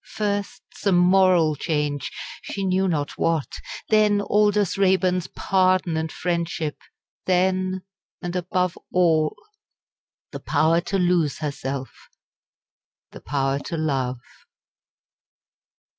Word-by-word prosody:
First 205 -1 -2
some 195 -3 +1
moral 180 -3 +4
change, 150 -2 -2 0.3
she 200 - -5
knew 190 +1 +2
not 150 -5 -2
what 165 -4 0 0.3
then 210 -1 +4
Aldous 205 -1 +2
Raeburn's 185 -2 +2
pardon 185 -3 +1
and 160 0 -2
friendship 170 -3 -2 0.5
then 185 0 +1 0.4
and 175 -1 -5
above 180 0 0 0.2
all, 160 -4 +2 1.0
the - - -6
power 165 +2 +2
to 195 +3 -2
lose 175 -5 +2
herself 140 -3 -4 1.2
the - - -11
power 135 0 -1
to 165 +3 -5
love. 135 -5 -1
180 Hz, 100 wpm, -23 LUFS, 155-190 Hz, 1.2 s, moral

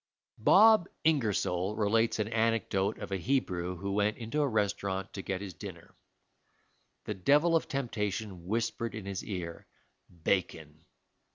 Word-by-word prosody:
Bob 210 - +6
Ingersoll 105 - +1
relates 110 +2 +2
an 105 -1 -1
anecdote 110 -3 +1
of 105 - -7
a 95 - 0
Hebrew 90 -5 -1
who 100 +3 -4
went 105 +1 +1
into 120 +6 -2
a 145 - +2
restaurant 100 -4 -1
to 100 - -5
get 95 0 -3
his 100 -3 -6
dinner. - - -10 1.1
The 105 - -3
devil 145 - +3
of 165 - +1
temptation 105 -8 -3
whispered 115 +1 -2
in 110 -3 -6
his 100 -1 -4
ear, 85 -4 -6 0.6
"Bacon." 80 -3 -2
105 Hz, 140 wpm, -30 LUFS, 95-115 Hz, 1.1 s, Bob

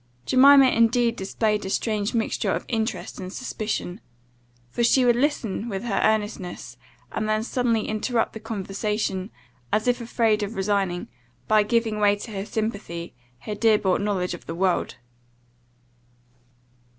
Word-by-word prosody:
Jemima 275 +1 +7
indeed 230 0 +3
displayed 210 +2 -1
a 190 - -4
strange 210 +1 -1
mixture 225 -1 0
of - - -2
interest 225 -2 -3
and 185 -1 -6
suspicion; 215 -5 -4 0.7
for 235 - -1
she 250 +2 +4
would 240 -1 +5
listen 255 -5 0
to - - -5
her - - -5
with 195 0 -4
earnestness, 205 - -1 0.4
and 215 - -2
then 215 0 +1
suddenly 235 -2 0
interrupt 225 +2 -1
the 220 - -7
conversation, 210 -2 -3 0.4
as 215 +3 +1
if 245 0 +2
afraid 225 -2 +1
of 205 +2 -4
resigning, 195 -2 -1 0.4
by 215 -1 +5
giving 220 0 0
way 205 -1 +4
to 215 +3 -8
her 200 0 -5
sympathy, 205 -6 -4 0.3
her 210 - -5
dear 215 +1 +4
bought 190 -1 +1
knowledge 195 -4 -1
of 175 - -10
the 165 - -4
world. 185 0 0
215 Hz, 150 wpm, -24 LUFS, 195-230 Hz, 0.7 s, Jemima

